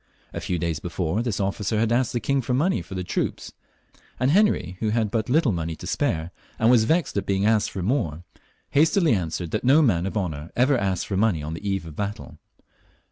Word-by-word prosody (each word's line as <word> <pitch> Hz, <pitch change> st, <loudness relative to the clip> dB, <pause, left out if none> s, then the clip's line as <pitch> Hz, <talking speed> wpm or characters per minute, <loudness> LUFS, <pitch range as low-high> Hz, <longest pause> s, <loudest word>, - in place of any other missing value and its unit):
A -, -, -4 dB
few 90 Hz, -, -2 dB
days 85 Hz, -2 st, -2 dB
before, 90 Hz, +4 st, -2 dB
this 120 Hz, -5 st, -2 dB
officer 100 Hz, +2 st, -1 dB
had 115 Hz, +1 st, +1 dB
asked 120 Hz, 0 st, +2 dB
the 120 Hz, -, -1 dB
king 140 Hz, +2 st, 0 dB
for 125 Hz, 0 st, -1 dB
money 155 Hz, -, +1 dB
for 85 Hz, +3 st, -9 dB
the 90 Hz, -, -3 dB
troops, -, -, -3 dB, 0.7 s
and 130 Hz, +2 st, +2 dB
Henry, 150 Hz, -, +2 dB
who 110 Hz, -, 0 dB
had 110 Hz, -2 st, 0 dB
but 115 Hz, +3 st, -1 dB
little 145 Hz, -2 st, +3 dB
money 85 Hz, -2 st, -3 dB
to -, -, -10 dB
spare, 80 Hz, +2 st, -1 dB, 0.3 s
and 115 Hz, +2 st, +4 dB
was 115 Hz, -3 st, +5 dB
vexed 165 Hz, -3 st, +1 dB
at 100 Hz, -, -2 dB
being 100 Hz, 0 st, +1 dB
asked 110 Hz, -1 st, +3 dB
for 95 Hz, -, -5 dB
more, 90 Hz, -, -1 dB, 0.5 s
hastily 160 Hz, +1 st, +4 dB
answered 85 Hz, -3 st, -2 dB
that -, -, -2 dB
no 140 Hz, +5 st, +5 dB
man 95 Hz, -, +2 dB
of 95 Hz, -, -3 dB
honour 80 Hz, -5 st, -3 dB
ever 130 Hz, +3 st, +3 dB
asked 95 Hz, -6 st, -1 dB
for 95 Hz, -, -2 dB
money 100 Hz, -7 st, +1 dB
on 75 Hz, +2 st, -4 dB
the 100 Hz, +5 st, -4 dB
eve 95 Hz, -2 st, -1 dB
of -, -, -7 dB
a 75 Hz, -, -12 dB
battle. 105 Hz, +3 st, -5 dB
105 Hz, 225 wpm, -24 LUFS, 90-125 Hz, 0.7 s, was